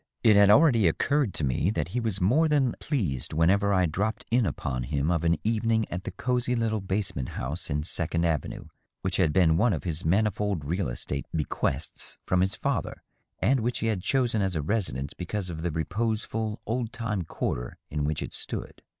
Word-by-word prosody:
It 110 -2 +6
had 100 0 +7
already 115 - +6
occurred 140 - +1
to - - 0
me 70 +6 +1
that 85 -6 -1
he 120 +7 -1
was 110 -5 -2
more 130 - +4
than 140 -5 +2
pleased 85 - -2
whenever 100 +6 +3
I 95 -2 +3
dropped 100 +7 -2
in 120 -3 +3
upon 65 -6 -3
him 70 +5 0
of 85 -2 0
an 85 -1 +3
evening 110 0 +1
at 90 +2 -4
the - - -3
cosey 125 0 0
little 110 -2 0
basement 95 -9 -2
house 75 +8 -5
in 75 0 -1
Second 85 +1 -1
Avenue 80 -3 -2 0.4
which 95 0 -1
had 85 -5 +3
been 80 -1 +4
one 110 +3 +3
of 80 - -3
his 85 -2 -3
manifold 100 -2 +1
real 90 +3 -1
estate 70 +3 -4
bequests 75 -1 -2
from 90 0 +2
his 95 +1 +1
fether, - - -2 0.4
and 130 +2 +4
which 120 +2 -1
he 115 - -1
had 95 - -4
chosen 120 -2 +1
as 95 -2 0
a 75 - -1
residence 75 - -1
because 90 +1 -4
of 80 -1 -6
the 85 - -1
reposeful, 110 +6 -2
old 115 0 -2
time 115 -5 -2
quarter - - -3
in 75 0 -1
which 75 +1 -1
it - - -7
stood. - - -3
95 Hz, 195 wpm, -27 LUFS, 80-110 Hz, 0.4 s, had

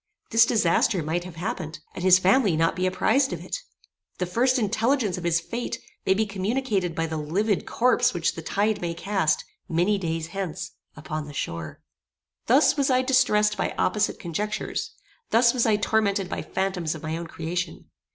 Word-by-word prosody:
This 230 0 +6
disaster 195 -3 +2
might 170 +3 -2
have 180 -3 -9
happened, 165 -2 -4 0.2
and 180 - -6
his 185 -1 +7
family 190 -1 +3
not 165 +1 +2
be 185 +1 0
apprized 265 +8 +2
of - - -6
it. - - -3 0.6
The 180 - -1
first 250 +8 +2
intelligence 225 -1 +1
of 180 - -6
his 170 -1 +2
fate 235 +8 -4 0.3
may 190 - +4
be 220 +2 +1
communicated 200 -3 -1
by 165 - 0
the 160 -1 -4
livid 185 +7 -1
corpse 250 +1 +3
which 170 -2 0
the 165 - -7
tide 205 +6 0
may 170 -1 -2
cast, 175 -4 0 0.2
many 180 +5 +2
days 165 -2 -3
hence, 190 -3 -4 0.3
upon 155 -1 -5
the 145 - -9
shore. 85 - -5 0.7
Thus 265 +6 +5
was 280 -1 +2
I 255 0 +3
distressed 230 -5 +3
by - - -2
opposite 210 +3 +1
conjectures: 205 +5 -3 0.3
thus 235 +1 +4
was 245 -2 +1
I 215 - +4
tormented 205 -2 +1
by - - -3
phantoms 180 -4 -2
of 155 - -10
my 160 0 -2
own 170 0 -5
creation. 165 +1 -4
190 Hz, 180 wpm, -25 LUFS, 165-220 Hz, 0.7 s, his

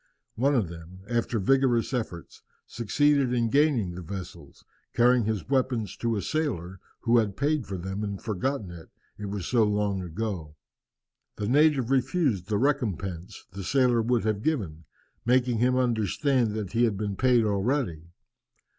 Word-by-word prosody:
One 140 +5 +1
of 110 -8 +1
them, 85 +2 -11
after 120 0 -1
vigorous 130 +3 +2
efforts, 110 -9 -5 0.2
succeeded 140 +3 +1
in 115 -2 +1
gaining 140 - +2
the 90 - -7
vessels, 85 -4 -9 0.3
carrying 120 -1 +4
his 110 -2 -2
weapons 125 -6 0
to 115 -1 -1
a 100 - -2
sailor 95 - -2 0.2
who 120 0 +4
had 105 -4 -1
paid 145 -2 0
for 95 - -4
them 95 +4 -4
and 100 -2 -4
forgotten 110 -1 -3
it, 85 -2 -11 0.3
it 105 - -5
was 100 -3 -4
so 120 +1 +3
long 105 -2 0
ago. 90 -3 -5 0.8
The 105 - -3
native 140 -1 +3
refused 130 - +1
the 105 -1 0
recompense 100 - -2
the 95 +1 -7
sailor 125 +1 +3
would 120 +1 +1
have 105 -2 0
given, 95 - -2 0.4
making 125 -1 +2
him 125 +2 +3
understand 120 - +1
that 105 -4 -4
he 120 +1 +3
had 105 -4 -1
been 100 -1 -3
paid 125 0 +3
already. 100 - -1
110 Hz, 155 wpm, -27 LUFS, 95-130 Hz, 0.8 s, carrying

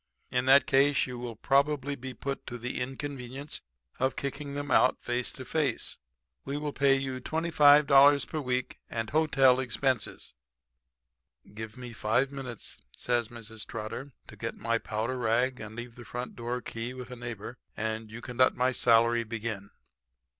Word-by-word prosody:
In 125 0 0
that 140 +1 +7
case 140 0 +4
you 125 -1 -6
will 120 -2 -5
be - - -33
probably 140 0 +2
put 130 +1 -5
to 120 - -5
the 125 +1 -4
inconvenience 135 +1 -4 0.4
of 130 -1 +1
kicking 140 +1 -4
them 145 0 -4
out 130 - +5
face 120 0 -2
to 130 - -8
face. 145 -6 -1 0.4
We 140 - -3
will 150 -1 -3
pay 140 -1 +4
you 135 -1 -3
$25 145 -3 +6
per 155 - -3
week 125 -1 -2
and 115 -1 -3
hotel 135 -5 +4
expenses.' 130 -1 -1 1.2
"'Give 110 +1 -7
me 125 -2 -8
five 125 +5 +1
minutes,' 130 -5 -6
says 120 -2 0
Mrs. 110 -2 -7
Trotter, 115 +5 -5 0.2
'to - - -11
get - - -4
my 115 0 0
powder 115 +5 -2
rag 125 +3 +1
and 110 0 -8
leave 120 0 -7
the 120 - -11
front 120 +2 -6
door 120 +1 -3
key 115 +2 -5
with 125 0 -8
a - - -5
neighbor 120 -1 -7 0.2
and 110 0 -2
you 115 +2 -8
can 125 -1 -8
let 130 - +5
my 125 +1 +2
salary 115 -1 +4
begin.' 110 -3 -4
125 Hz, 165 wpm, -29 LUFS, 115-140 Hz, 1.2 s, that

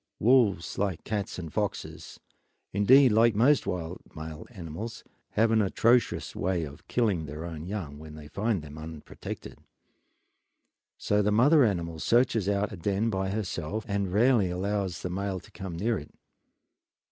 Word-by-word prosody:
Wolves, 110 -8 +3
like 95 -4 -1
cats 105 -2 -3
and 85 -4 -7
foxes, 105 -2 -4 0.5
and 100 +1 0
indeed 135 -1 +8
like 115 +1 +4
most 130 +6 +4
wild 90 0 -4
male 80 +1 -7
animals, 100 +1 -7 0.3
have 110 +1 +3
an 110 -1 +4
atrocious 115 +5 +2
way 90 -2 0
of 70 -2 -10
killing 100 -10 0
their 75 +4 -6
own 80 -1 -6
young 85 -8 -5
when 75 0 -10
they 75 -1 -10
find 100 +1 -1
them 75 0 -10
unprotected; 80 -1 -8 1.4
so 105 0 +1
the 105 +1 +1
mother 140 +8 +6
animal 85 -7 -1
searches 115 -1 +2
out 100 0 0
a 105 - -7
den 100 +6 0
by 95 -1 -1
herself 100 0 -3
and 100 -2 -1
rarely 110 -1 +4
allows 95 0 -2
the 90 - -2
male 95 0 -2
to - - -18
come 95 -3 -6
near 110 +5 0
it. 75 - -11
100 Hz, 160 wpm, -28 LUFS, 85-110 Hz, 1.4 s, indeed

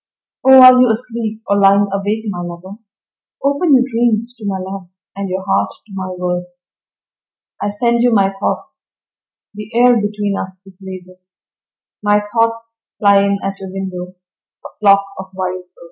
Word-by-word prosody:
Oh 265 0 +8
are 255 0 +9
you 250 - +4
asleep, 225 -1 -4
or 200 0 +2
lying 200 +1 +4
awake, 205 +3 -2
my 180 -4 -4
lover? 175 +4 -9 0.6
Open 285 +2 +3
your 255 - +4
dreams 235 -1 0
to 215 - -8
my 195 -1 -1
love 190 -1 -7 0.3
and 200 -1 -4
your 185 +1 -4
heart 100 +1 +1 0.2
to 215 - -20
my 190 -1 -5
words. 180 0 -5 0.9
I 205 - -1
send 235 +3 0
you 245 0 +3
my 195 -3 +2
thoughts - - -4 0.7
the 210 +1 -9
air 245 +1 +5
between 205 -1 -2
us 185 0 -7
is 190 -1 -17
laden, 185 -1 -10 0.8
My 205 0 +2
thoughts 230 0 -1 0.2
fly 200 -1 +4
in 200 0 +1
at 195 0 -4
your 190 - -7
window, 185 -1 -6 0.5
a - - -7
flock 200 -1 +4
of 190 0 -8
wild 185 -1 -4
birds. 180 - -44
200 Hz, 165 wpm, -16 LUFS, 185-230 Hz, 0.9 s, are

